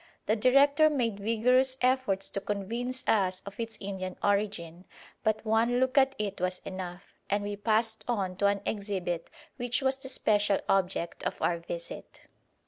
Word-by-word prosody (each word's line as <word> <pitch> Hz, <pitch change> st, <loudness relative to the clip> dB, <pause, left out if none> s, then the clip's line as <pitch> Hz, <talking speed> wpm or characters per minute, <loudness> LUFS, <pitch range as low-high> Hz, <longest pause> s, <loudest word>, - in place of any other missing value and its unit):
The 215 Hz, -, +2 dB
director 280 Hz, +6 st, +5 dB
made 235 Hz, -8 st, -1 dB
vigorous 250 Hz, +5 st, +2 dB
efforts 255 Hz, -7 st, +1 dB
to 195 Hz, -, -3 dB
convince 235 Hz, +6 st, -3 dB
us 185 Hz, -3 st, +2 dB
of 200 Hz, +2 st, -9 dB
its 230 Hz, -1 st, -4 dB
Indian 190 Hz, -2 st, -5 dB
origin, 200 Hz, -4 st, -1 dB, 0.4 s
but 220 Hz, +1 st, 0 dB
one 230 Hz, +3 st, +2 dB
look 260 Hz, 0 st, +1 dB
at 270 Hz, -1 st, +4 dB
it 205 Hz, -4 st, -3 dB
was 185 Hz, 0 st, 0 dB
enough; 185 Hz, 0 st, -7 dB, 0.2 s
and 205 Hz, 0 st, +1 dB
we 205 Hz, 0 st, -3 dB
passed 220 Hz, +1 st, +1 dB
on 195 Hz, -6 st, -1 dB
to 200 Hz, -, +3 dB
an 200 Hz, 0 st, +1 dB
exhibit 190 Hz, -5 st, -3 dB, 0.3 s
which 245 Hz, +1 st, -1 dB
was 265 Hz, 0 st, +2 dB
the 265 Hz, -1 st, -5 dB
special 205 Hz, -5 st, +2 dB
object 185 Hz, -3 st, 0 dB
of -, -, -3 dB
our 170 Hz, -1 st, +1 dB
visit. 170 Hz, 0 st, -7 dB
210 Hz, 160 wpm, -29 LUFS, 195-245 Hz, 0.4 s, director